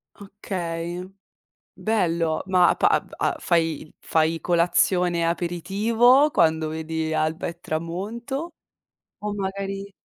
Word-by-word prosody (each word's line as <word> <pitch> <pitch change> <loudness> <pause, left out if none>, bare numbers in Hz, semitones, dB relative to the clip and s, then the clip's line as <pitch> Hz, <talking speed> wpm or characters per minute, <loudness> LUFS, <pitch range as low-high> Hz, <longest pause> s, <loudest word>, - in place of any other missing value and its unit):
Okay, 180 -4 -5 0.7
bello, 170 -7 0
ma 180 -2 +4
pa - - +3 0.3
av - - 0
fai 165 -3 0
fai 160 0 +1
colazione, 175 +1 +2
aperitivo 215 - +3
quando 160 - +2
vedi 160 0 -3
alba 155 +1 -1
e 170 0 -6
tramonto? 220 - -4 0.7
O 210 - -2
magari 195 0 -4
175 Hz, 95 wpm, -24 LUFS, 165-200 Hz, 0.7 s, ma